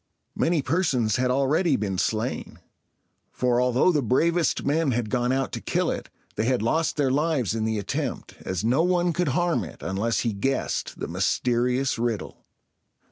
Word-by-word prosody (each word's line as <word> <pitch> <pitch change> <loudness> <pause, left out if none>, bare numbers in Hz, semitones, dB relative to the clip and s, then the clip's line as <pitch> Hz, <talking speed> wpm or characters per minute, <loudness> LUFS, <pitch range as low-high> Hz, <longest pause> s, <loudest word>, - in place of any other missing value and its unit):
Many 165 -4 +1
persons 130 - +1
had 125 0 +1
already 140 +5 +2
been 100 -4 -2
slain; 115 +4 -2 0.7
for, 125 -1 +1
although 125 +7 +3
the 150 -4 +1
bravest 165 +8 +1
men 145 -1 +1
had 115 -2 -2
gone 125 0 +1
out 135 0 0
to - - -5
kill - - 0
it, - - -5 0.3
they 110 - +1
had 125 -3 +1
lost 155 +9 0
their 140 -3 +2
lives 145 - +1
in 110 -1 -1
the 110 0 0
attempt, 100 - -3
as 95 +2 -3
no 125 +7 +3
one 175 0 +2
could 175 +2 0
harm 175 - +1
it 80 - -10
unless 105 +5 0
he 115 -3 -1
guessed 135 +7 -2
the - - -3
mysterious 125 +1 0
riddle. 115 -4 -3
125 Hz, 170 wpm, -25 LUFS, 115-155 Hz, 0.7 s, although